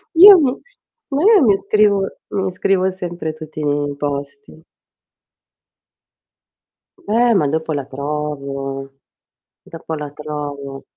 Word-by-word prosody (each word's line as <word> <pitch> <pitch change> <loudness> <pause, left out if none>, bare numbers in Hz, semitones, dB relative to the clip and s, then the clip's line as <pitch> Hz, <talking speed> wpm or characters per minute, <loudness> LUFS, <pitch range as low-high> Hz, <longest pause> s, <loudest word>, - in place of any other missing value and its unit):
Io 390 +3 +10
mi 265 -5 +2 0.6
ma 275 +2 0
io 420 -4 +6
mi 205 -5 +4
scrivo 200 -1 +2 0.2
mi 190 -1 -2
scrivo 185 +1 +1
sempre 175 -3 -5
tutti 155 -1 -8
nei 145 -1 -1
posti. 145 +5 -6 2.4
Eh, 240 - +2
ma 160 -8 +2
dopo 160 +2 -2
la 140 -2 -3
trovo 140 -1 -5 0.7
dopo 165 0 -8
la 150 -2 -6
trovo. 145 -2 -7
155 Hz, 110 wpm, -18 LUFS, 145-200 Hz, 2.4 s, Io